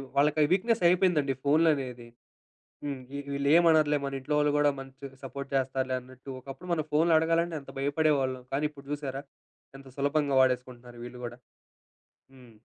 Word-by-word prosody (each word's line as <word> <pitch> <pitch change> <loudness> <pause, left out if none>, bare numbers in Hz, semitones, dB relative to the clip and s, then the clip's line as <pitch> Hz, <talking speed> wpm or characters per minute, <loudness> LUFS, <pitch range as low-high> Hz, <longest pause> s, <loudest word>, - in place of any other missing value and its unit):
వాళ్ళకి 150 +2 +3
ఆ - - +7
వీక్‌నెసయిపోయిందండి 180 - +3
ఫోన్‌లనేది. 140 -6 +2 0.8
హ్మ్. 140 -2 -4
ఈ - - -3
వీళ్ళు 140 0 0
ఏమనరులే, 155 -3 +5
మన 140 - -4
ఇంట్లో 150 +3 -2
వాళ్ళు 150 0 +3
గూడా 145 0 +4
మంచిగా 135 0 -10
సపోర్ట్ 140 +1 -6
చేస్తారులే 130 -1 0
అన్నట్టు. 130 +2 -14
ఒకప్పుడు 135 +7 -10
మనం 155 -2 -1
ఫోనులు 160 +2 +4
అడగాలంటే 165 0 +1
ఎంత - - -12
భయపడేవాళ్ళం. 140 -3 +1
కానీ, 145 +2 +1
ఇప్పుడు 140 -1 -15
జూసారా? 140 -1 -4 0.5
ఎంత 135 0 -14
సులభంగా 145 0 +1
వాడేసుకుంటున్నారు 125 -1 -1
వీళ్ళు 125 0 -9
గూడా. 120 +1 -7 1.0
హ్మ్. 125 -4 -17
140 Hz, 145 wpm, -28 LUFS, 130-155 Hz, 1.0 s, ఆ